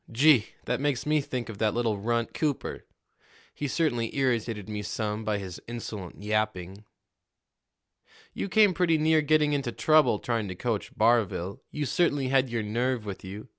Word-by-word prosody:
Gee! 130 Hz, -1 st, +5 dB, 0.2 s
that 125 Hz, 0 st, -1 dB
makes 145 Hz, -3 st, 0 dB
me 150 Hz, 0 st, +2 dB
think 125 Hz, -3 st, -4 dB
of 110 Hz, -3 st, -8 dB
that 110 Hz, 0 st, +1 dB
little 115 Hz, -4 st, 0 dB
runt, 115 Hz, +2 st, -1 dB
Cooper! 150 Hz, -4 st, -2 dB, 0.7 s
He 145 Hz, -, -3 dB
certainly 130 Hz, -6 st, -1 dB
irritated 115 Hz, -6 st, 0 dB
me 105 Hz, -1 st, -4 dB
some 105 Hz, +1 st, -3 dB
by 105 Hz, -1 st, 0 dB
his 95 Hz, -3 st, -7 dB
insolent 105 Hz, -5 st, -7 dB
yapping." 105 Hz, -2 st, -2 dB, 1.5 s
"You -, -, -3 dB
came 210 Hz, -1 st, +5 dB
pretty 170 Hz, -3 st, +2 dB
near 155 Hz, 0 st, +3 dB
getting 150 Hz, 0 st, +3 dB
into 140 Hz, -4 st, -1 dB
trouble 155 Hz, -4 st, +4 dB
trying 115 Hz, -1 st, -2 dB
to 90 Hz, -, -5 dB
coach 110 Hz, +1 st, -2 dB
Barville. 110 Hz, -5 st, +1 dB
You 150 Hz, -1 st, -3 dB
certainly 145 Hz, -3 st, +1 dB
had 135 Hz, -1 st, +3 dB
your 115 Hz, -2 st, -2 dB
nerve 120 Hz, +2 st, -1 dB
with 100 Hz, -2 st, -6 dB
you. 100 Hz, +3 st, -8 dB
120 Hz, 165 wpm, -27 LUFS, 105-145 Hz, 1.5 s, Gee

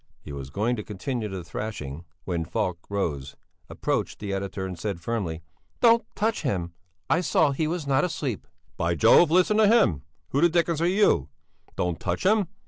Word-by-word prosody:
He 75 Hz, -, -10 dB
was 70 Hz, -1 st, -6 dB
going 110 Hz, -, 0 dB
to 105 Hz, -, -4 dB
continue 110 Hz, +2 st, -4 dB
the 95 Hz, -2 st, -5 dB
thrashing 85 Hz, -5 st, -6 dB, 0.2 s
when 85 Hz, -3 st, -2 dB
Falk 85 Hz, +1 st, -2 dB
rose, 75 Hz, -9 st, -3 dB, 0.3 s
approached -, -, -2 dB
the 100 Hz, -1 st, -4 dB
editor, 95 Hz, 0 st, -3 dB
and 95 Hz, -1 st, -5 dB
said 100 Hz, -2 st, -3 dB
firmly: 85 Hz, -5 st, -3 dB, 0.4 s
"Don't 235 Hz, -1 st, +5 dB
touch 225 Hz, +2 st, 0 dB
him! 90 Hz, -, -2 dB, 0.3 s
I 165 Hz, -, +2 dB
saw 160 Hz, -3 st, +3 dB
that 135 Hz, -, -4 dB
he 160 Hz, -, +1 dB
was 165 Hz, -1 st, -3 dB
not 140 Hz, +2 st, +2 dB
asleep!" 150 Hz, -, -3 dB, 0.3 s
"By 85 Hz, +1 st, 0 dB
jove! 150 Hz, -, +6 dB
Listen 185 Hz, +5 st, +3 dB
to 215 Hz, -1 st, +6 dB
him! 200 Hz, -, +4 dB, 0.3 s
Who 140 Hz, -, +1 dB
the 170 Hz, -, +6 dB
dickens 170 Hz, -1 st, +1 dB
are 170 Hz, -, +3 dB
you? 180 Hz, -, +3 dB, 0.5 s
Don't 90 Hz, -2 st, -1 dB
touch -, -, -2 dB
him! 205 Hz, -1 st, +3 dB
105 Hz, 185 wpm, -26 LUFS, -, 0.5 s, jove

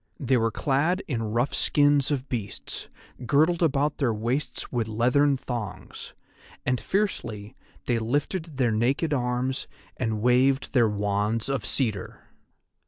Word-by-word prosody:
They 130 Hz, -3 st, +2 dB
were 115 Hz, -2 st, +2 dB
clad 145 Hz, -, 0 dB
in 120 Hz, -6 st, -2 dB
rough 115 Hz, +5 st, 0 dB
skins 145 Hz, -1 st, +3 dB
of 140 Hz, -2 st, -2 dB
beasts, 110 Hz, -5 st, -5 dB, 0.4 s
girdled 160 Hz, +7 st, +3 dB
about 150 Hz, -2 st, +1 dB
their 130 Hz, -5 st, +2 dB
waists 120 Hz, +7 st, -2 dB
with 120 Hz, -3 st, -1 dB
leathern 125 Hz, +6 st, +2 dB
thongs, 105 Hz, -7 st, -6 dB, 0.5 s
and 125 Hz, -1 st, 0 dB
fiercely 120 Hz, -, -2 dB, 0.3 s
they 120 Hz, -2 st, +1 dB
lifted 145 Hz, +6 st, -2 dB
their 125 Hz, -4 st, +2 dB
naked 135 Hz, +8 st, +1 dB
arms, 125 Hz, 0 st, -1 dB, 0.3 s
and 110 Hz, -3 st, -1 dB
waved 130 Hz, +5 st, +2 dB
their 120 Hz, -4 st, +4 dB
wands 105 Hz, +3 st, -1 dB
of 135 Hz, -5 st, -1 dB
cedar. 105 Hz, -3 st, -2 dB
125 Hz, 130 wpm, -26 LUFS, 115-140 Hz, 0.5 s, their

